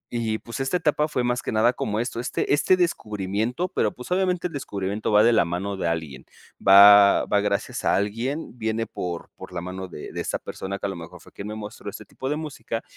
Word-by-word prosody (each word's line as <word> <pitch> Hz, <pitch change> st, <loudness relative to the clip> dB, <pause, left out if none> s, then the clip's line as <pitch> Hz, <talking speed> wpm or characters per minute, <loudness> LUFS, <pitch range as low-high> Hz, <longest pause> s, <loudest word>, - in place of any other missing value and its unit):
Y 110 Hz, -2 st, 0 dB
pues 115 Hz, +4 st, -8 dB
esta 135 Hz, +7 st, 0 dB
etapa 150 Hz, -2 st, +1 dB
fue 125 Hz, -5 st, -1 dB
más 120 Hz, 0 st, 0 dB
que -, -, -4 dB
nada 115 Hz, +3 st, +3 dB
como 105 Hz, -2 st, -2 dB
esto, 120 Hz, 0 st, -3 dB
este 125 Hz, -, -1 dB
este 185 Hz, +5 st, +4 dB
descubrimiento, 110 Hz, -, -1 dB
pero 105 Hz, -, 0 dB
pues 125 Hz, +8 st, -11 dB
obviamente 180 Hz, -1 st, +1 dB
el 170 Hz, -, -3 dB
descubrimiento 100 Hz, -5 st, -3 dB
va 105 Hz, +1 st, +6 dB
de 120 Hz, 0 st, +5 dB
la 110 Hz, -, +5 dB
mano 90 Hz, +4 st, -3 dB
de 90 Hz, -, -2 dB
alguien. 80 Hz, -6 st, -4 dB, 0.4 s
Va, 100 Hz, +1 st, +8 dB
va 100 Hz, -, +2 dB
gracias 100 Hz, -1 st, -2 dB
a -, -, +3 dB
alguien, 115 Hz, +10 st, -2 dB
viene 110 Hz, +1 st, -1 dB
por 85 Hz, -2 st, -6 dB
por -, -, -11 dB
la 85 Hz, -1 st, -4 dB
mano 95 Hz, +1 st, -6 dB
de 75 Hz, -, -9 dB
de -, -, -4 dB
esa -, -, -2 dB
persona 100 Hz, +1 st, -6 dB
que 100 Hz, -, -5 dB
a -, -, 0 dB
lo 95 Hz, -, -5 dB
mejor 85 Hz, -1 st, -10 dB
fue -, -, -17 dB
quien 100 Hz, -, -8 dB
me 105 Hz, -, -5 dB
mostró 105 Hz, -1 st, -7 dB
este 100 Hz, -, -9 dB
tipo 130 Hz, -, -6 dB
de 150 Hz, -, 0 dB
música, 150 Hz, -7 st, -5 dB
110 Hz, 230 wpm, -24 LUFS, 100-125 Hz, 0.4 s, Va